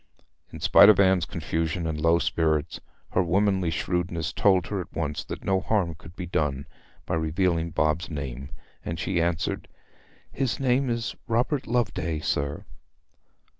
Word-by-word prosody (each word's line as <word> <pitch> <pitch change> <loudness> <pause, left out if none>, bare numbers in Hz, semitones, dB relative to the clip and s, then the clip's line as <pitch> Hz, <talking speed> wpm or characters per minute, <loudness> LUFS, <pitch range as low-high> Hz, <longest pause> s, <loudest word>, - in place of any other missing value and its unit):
In - - -9
spite - - +7
of 105 - +6
Anne's 95 -3 +4
confusion 80 +1 -2
and 80 -1 -3
low 85 +1 +4
spirits, 80 -3 0 0.3
her 90 - +2
womanly 95 0 +1
shrewdness 85 0 -2
told 95 -3 +3
her 100 -3 -3
at 85 - -10
once 75 -3 -2
that - - -7
no 95 -1 +2
harm 95 -4 0
could 85 +2 -14
be 90 - -5
done 75 -5 -1 0.4
by - - -3
revealing 85 +1 0
Bob's 80 0 0
name; 70 -3 -5 0.3
and 85 - -4
she 85 +1 0
answered, 85 -1 -1 0.6
'His 130 -3 -1
name 130 0 +2
is 115 0 -2
Robert 125 +5 0
Loveday, 95 -9 -1
sir.' 70 -1 -2
85 Hz, 150 wpm, -26 LUFS, 80-95 Hz, 0.6 s, spite